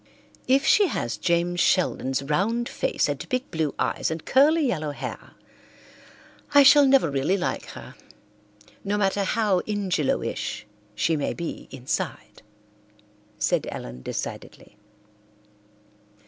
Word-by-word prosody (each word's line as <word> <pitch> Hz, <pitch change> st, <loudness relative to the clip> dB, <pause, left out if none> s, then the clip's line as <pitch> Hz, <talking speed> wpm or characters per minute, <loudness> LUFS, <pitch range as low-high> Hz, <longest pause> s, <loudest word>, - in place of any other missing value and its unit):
"If 270 Hz, +3 st, +3 dB
she 405 Hz, +4 st, +5 dB
has 120 Hz, -, -3 dB
James 175 Hz, 0 st, 0 dB
Sheldon's 140 Hz, -8 st, +1 dB
round 205 Hz, +12 st, 0 dB
face -, -, -1 dB
and -, -, -4 dB
big 255 Hz, 0 st, -2 dB
blue 160 Hz, -3 st, -2 dB
eyes -, -, -1 dB
and 160 Hz, 0 st, -5 dB
curly 300 Hz, +4 st, +4 dB
yellow 155 Hz, -, -1 dB
hair 145 Hz, -, -7 dB, 1.2 s
I 285 Hz, -, +9 dB
shall 280 Hz, +1 st, +7 dB
never 265 Hz, -, +4 dB
really 140 Hz, +8 st, +1 dB
like 180 Hz, -, -3 dB
her, -, -, -10 dB, 0.9 s
no 205 Hz, +1 st, -1 dB
matter 200 Hz, 0 st, +1 dB
how 205 Hz, -1 st, +1 dB
Ingelowish 180 Hz, -, -2 dB, 0.3 s
she 160 Hz, +9 st, +1 dB
may 145 Hz, -, -2 dB
be 170 Hz, -1 st, -6 dB
inside," 130 Hz, -1 st, -5 dB, 1.0 s
said -, -, 0 dB
Ellen 60 Hz, +1 st, -8 dB
decidedly. -, -, -7 dB
185 Hz, 120 wpm, -25 LUFS, 150-255 Hz, 1.2 s, I